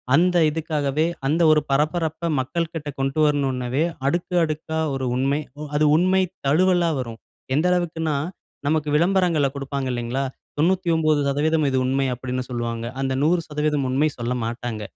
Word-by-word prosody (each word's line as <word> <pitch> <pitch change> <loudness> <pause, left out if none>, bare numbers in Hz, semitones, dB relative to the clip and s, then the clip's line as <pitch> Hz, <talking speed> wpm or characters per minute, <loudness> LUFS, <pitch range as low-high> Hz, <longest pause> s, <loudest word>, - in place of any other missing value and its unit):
அந்த 180 +2 +3
இதுக்காகவே 150 -1 -1 0.2
அந்த 160 +4 +1
ஒரு 150 -1 +4
பரபரப்பை 160 +3 0
மக்கள்கிட்ட 160 +2 -3
கொண்டு 135 +3 -1
வரணுனவே 135 -1 0 0.2
அடுக்கு 175 +3 -1
அடுக்கா 160 0 -2 0.2
ஒரு 130 -1 -2
உண்மை, 140 +3 +1 0.2
அ - - -6 0.2
அது 155 - +3
உண்மை 185 +2 +3 0.3
தழுவலா 175 +3 +3
வரும். 115 -3 -6 0.4
எந்த 155 +4 +2
அளவுக்குனா 160 -4 0 0.5
நமக்கு 155 -1 +1
விளம்பரங்கள 170 -3 +3
கொடுப்பாங்க 140 -1 -3
இல்லைங்களா? 120 +3 -2 0.3
99% 155 -3 +2
இது 130 - 0
உண்மை 135 +1 +1
அப்படினு 125 +1 -3
சொல்வாங்க. 115 -1 -3 0.2
அந்த 135 -1 0
100% 150 -4 0
உண்மை 140 +4 +2
சொல்லமாட்டாங்க. 120 -1 -3
150 Hz, 130 wpm, -23 LUFS, 135-165 Hz, 0.5 s, ஒரு